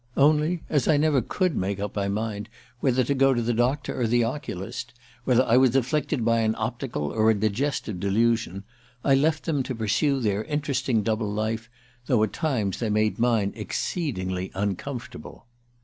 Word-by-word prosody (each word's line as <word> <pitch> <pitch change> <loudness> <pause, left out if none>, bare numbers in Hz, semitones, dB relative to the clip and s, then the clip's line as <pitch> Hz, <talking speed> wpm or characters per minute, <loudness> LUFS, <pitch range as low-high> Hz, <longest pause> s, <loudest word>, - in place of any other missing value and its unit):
Only, 155 +4 +3
as 145 -5 +1
I 150 - +4
never 145 -3 +3
could 185 - -1
make 95 +1 -1
up 100 0 -4
my 100 -1 0
mind 105 +1 -3 0.3
whether 130 -1 +2
to 140 - 0
go 135 -1 +3
to 120 - 0
the 120 +1 0
doctor 130 +3 0
or 120 - +2
the 120 +1 +3
oculist 120 -1 -5 0.3
whether 125 0 +4
I 120 -1 +3
was 130 -1 +4
afflicted 135 -1 0
by 115 0 +3
an 110 0 +1
optical 115 - -3
or 110 0 +3
a 110 - +4
digestive 110 -1 -1
delusion 105 0 +1 0.4
I 140 - +4
left 155 +3 +2
them 150 -5 0
to 130 0 -4
pursue 125 +6 +1
their 105 -3 0
interesting 135 -6 0
double 110 -1 -1
life, 110 +2 -2 0.4
though 120 -4 +3
at 110 - -1
times 120 - -1
they 115 - -1
made 110 +1 +1
mine 115 -4 +2
exceedingly 95 - -3 0.3
comfortable 125 +1 -8
115 Hz, 175 wpm, -25 LUFS, 110-135 Hz, 0.4 s, I